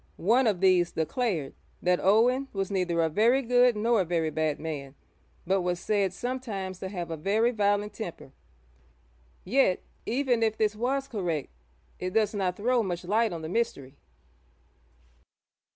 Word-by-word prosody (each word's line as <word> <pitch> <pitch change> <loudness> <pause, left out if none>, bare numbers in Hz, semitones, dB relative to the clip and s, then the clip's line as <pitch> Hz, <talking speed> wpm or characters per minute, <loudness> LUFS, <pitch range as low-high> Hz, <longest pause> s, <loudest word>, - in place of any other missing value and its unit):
One 235 +7 +3
of 195 -4 0
these 180 -2 +4
declared 165 - -1 0.3
that 180 0 +2
Owen 245 +7 +3
was 195 -1 -2
'neither 180 -3 0
a - - +2
very 230 - +3
good 245 0 +4
nor 225 0 +2
a - - +2
very 165 -2 -1
bad 155 0 -1
man, 145 -4 -6 0.5
but 190 +2 +1
was 175 0 -1
said 200 -2 0
sometimes 200 -5 -4
to 190 - -5
have 175 -4 -5
a - - -2
very 215 +9 +2
violent 205 -2 0
temper.' 175 - -7 1.1
Yet, 195 -3 +2 0.2
even 245 -1 +1
if 220 -1 +1
this 215 -1 +1
was 265 +5 -1
correct, 175 - -3 0.5
it 185 0 -4
does 215 -1 +2
not 185 -3 -1
throw 245 +3 +2
much 180 -4 -4
light 220 +3 +2
on 165 -2 -6
the - - -4
mystery. 145 - -2
200 Hz, 155 wpm, -28 LUFS, 175-230 Hz, 1.1 s, these